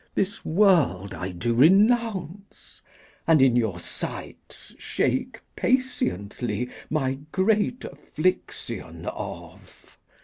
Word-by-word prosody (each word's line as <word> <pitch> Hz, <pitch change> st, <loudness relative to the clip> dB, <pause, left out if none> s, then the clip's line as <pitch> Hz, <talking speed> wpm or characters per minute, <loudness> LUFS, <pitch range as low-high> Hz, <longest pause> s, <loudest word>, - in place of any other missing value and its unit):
This 200 Hz, +1 st, -1 dB
world 160 Hz, -, +3 dB
I 90 Hz, -, -4 dB
do 105 Hz, +7 st, -2 dB
renounce, 200 Hz, -, +2 dB, 0.5 s
and, 165 Hz, -2 st, +6 dB
in 130 Hz, -2 st, +5 dB
your 110 Hz, -7 st, 0 dB
sights, -, -, -7 dB
Shake -, -, -1 dB, 0.2 s
patiently 125 Hz, -, -1 dB, 0.2 s
my 135 Hz, -3 st, -1 dB
great 215 Hz, +5 st, +1 dB
affliction 370 Hz, -, -3 dB
off. -, -, -9 dB
155 Hz, 90 wpm, -25 LUFS, -, 0.5 s, and